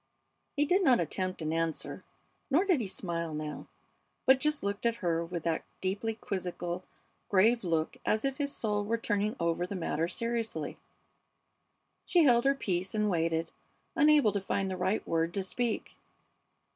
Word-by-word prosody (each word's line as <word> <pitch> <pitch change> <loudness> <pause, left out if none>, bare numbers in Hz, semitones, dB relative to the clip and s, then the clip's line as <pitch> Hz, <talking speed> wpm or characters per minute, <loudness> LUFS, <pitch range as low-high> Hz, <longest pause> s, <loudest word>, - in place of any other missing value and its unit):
He 290 0 +3
did 370 +6 +3
not 255 -7 +5
attempt 185 -3 -2
an 155 +1 -1
answer, 165 -1 -2 0.5
nor 315 +8 +3
did 355 -9 +3
he 210 - -2
smile 170 -4 -3
now, 150 0 -5 0.6
but 265 0 +6
just 300 +1 0
looked 200 0 -2
at 230 - +1
her 170 -6 0
with 170 -1 -5
that 165 -1 0 0.2
deeply 205 +4 -1
quizzical, 180 -4 -4 0.5
grave 220 +4 +4
look 165 -3 0
as 215 +4 +1
if 270 -1 -1
his 280 -1 -1
soul 210 -5 -1
were 225 +3 0
turning 210 -1 0
over 170 +1 0
the 200 - -5
matter 165 -2 -1
seriously. 225 -7 -3 1.3
She 350 -3 +5
held 240 -4 +5
her 275 0 +4
peace 190 -5 -2
and 210 -1 +2
waited, 165 -1 0 0.4
unable 295 -6 +5
to 200 0 -1
find 195 0 -1
the - - -2
right 190 +4 -1
word 165 +1 0
to 195 - 0
speak. 230 +4 -2
200 Hz, 165 wpm, -31 LUFS, 170-235 Hz, 1.3 s, but